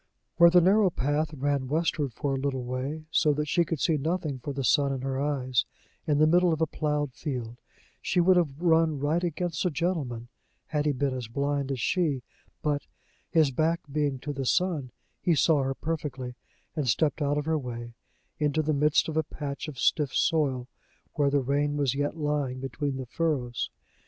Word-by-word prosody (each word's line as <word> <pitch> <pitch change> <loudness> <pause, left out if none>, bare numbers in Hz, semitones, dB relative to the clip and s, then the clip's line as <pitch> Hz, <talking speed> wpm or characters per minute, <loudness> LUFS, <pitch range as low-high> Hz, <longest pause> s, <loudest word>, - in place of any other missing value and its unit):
Where 170 0 +8
the 180 +1 +6
narrow 195 +3 +5
path 145 +1 -1
ran 140 -1 0
westward 150 -2 0
for 135 +4 -2
a 135 - -1
little 135 -2 -2
way, 130 +5 -4
so 150 -2 +3
that 150 +1 -2
she 170 - +3
could 165 -2 -3
see 160 +1 +2
nothing 155 -2 -2
for 135 +4 -5
the 135 0 -3
sun 140 +2 +3
in 135 -2 -3
her 135 0 -2
eyes, 130 -4 +1 0.4
in 150 -2 +3
the 155 - +5
middle 175 +2 +4
of 160 - 0
a 160 - +3
plowed 150 -3 -2
field 125 -6 -5 0.4
she 180 - 0
would 185 +2 +5
have 155 -5 +1
run 160 -2 +4
right 155 +5 0
against 175 0 -2
a 180 - +2
gentleman, 145 -8 -2 0.4
had 150 -1 0
he - - +4
been 140 0 -1
as 125 -3 -4
blind 140 +3 -1
as 135 - -2
she; 145 -1 0 0.4
but, 145 -1 -1 0.4
his 160 -5 +3
back 160 +6 +1
being 145 -2 0
to 145 - -4
the 135 -1 -3
sun, 170 -7 +1 0.3
he 175 -3 +3
saw 155 -1 +4
her 135 0 -1
perfectly, 145 -6 -4 0.4
and 150 -5 -1
stepped 150 +6 +1
out 145 0 +1
of 150 - -1
her 160 -1 +1
way 120 -2 -6 0.5
into 150 +1 +1
the 155 +1 +1
midst 150 +1 +3
of 160 -1 -3
a - - +5
patch 145 0 -6
of 150 -4 -8
stiff 145 +2 +1
soil, 135 -6 +1 0.5
where 145 -3 +2
the 140 0 +2
rain 145 +2 0
was 140 -3 +1
yet 145 +3 -2
lying 145 -4 -1
between 135 +2 -3
the 130 - -5
furrows. 125 -3 -1
145 Hz, 195 wpm, -28 LUFS, 135-160 Hz, 0.5 s, Where